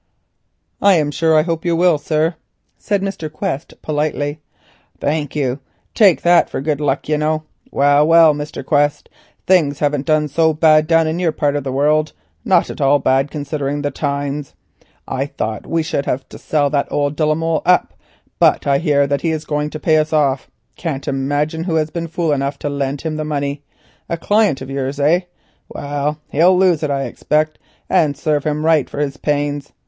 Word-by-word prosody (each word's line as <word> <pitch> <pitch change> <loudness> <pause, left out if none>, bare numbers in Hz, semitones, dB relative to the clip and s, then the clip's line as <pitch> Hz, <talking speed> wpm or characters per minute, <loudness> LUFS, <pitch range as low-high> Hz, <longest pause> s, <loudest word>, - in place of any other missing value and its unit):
"I 200 -1 +5
am 150 -3 +1
sure 160 +2 +2
I 155 - +4
hope 165 -1 -3
you 170 -1 +1
will, 170 -2 +3
sir," 155 +3 0 0.4
said 200 -2 -2
Mr. 180 -6 -4
Quest 155 -2 -5
politely. 150 0 -2 0.6
"Thank 150 0 -2
you; 135 -2 -1 0.3
take 200 -7 +4
that 175 0 +4
for - - -4
good 150 +1 -2
luck, 140 -1 -1
you 150 0 0
know. 155 0 0 0.3
Well, 145 +2 +3
well, 165 -1 +6
Mr. 145 0 -6
Quest, 145 -1 +1 0.4
things 155 -7 +3
haven't 145 -1 -1
done 155 -1 +2
so 160 +2 +1
bad 155 -1 +4
down 165 0 +4
in 160 +2 -2
your 175 -3 +1
part 145 -2 0
of 145 - -2
the 135 - -3
world; 150 +3 +1 0.3
not 180 -3 +2
at - - -8
all 140 +1 +4
bad 135 +1 +1
considering 145 -1 -3
the 145 - -1
times. 140 -1 -3 0.5
I 135 +1 -2
thought 110 -6 -5
we 165 -1 0
should 140 -2 -2
have 130 - -1
had - - -38
to - - -10
sell 145 -2 0
that 145 -1 -1
old 145 0 0
de 155 - -1
la 155 0 +2
Molle 165 0 -1
up, 180 0 +2 0.5
but - - +3
I 140 -1 +2
hear 145 -3 +2
that 140 0 -1
he 165 - 0
is 155 -1 -3
going 150 0 -2
to 155 - -7
pay 155 +1 +3
us 155 0 0
off. 140 -4 +1 0.3
Can't 145 -5 -4
imagine 145 +4 -1
who 170 -3 -1
has 155 -1 0
been 170 -1 -4
fool 165 -1 -1
enough 140 0 -1
to 145 - -4
lend 140 0 -3
him 155 -1 -3
the 155 - -2
money. 145 -1 -3 0.5
A 170 - -1
client 205 -5 +1
of 130 - -7
yours, 135 +1 -3
eh? 165 +6 +2 0.4
Well, 145 +1 -3
he'll 175 +5 +4
lose 180 -4 +3
it 150 - -1
I 140 -1 -1
expect, 155 +2 -1 0.3
and 145 -3 +2
serve 150 -2 -1
him 150 0 -1
right 160 -4 +3
for - - -9
his 145 -1 -2
pains. 145 -1 -2
150 Hz, 200 wpm, -18 LUFS, 145-160 Hz, 0.6 s, well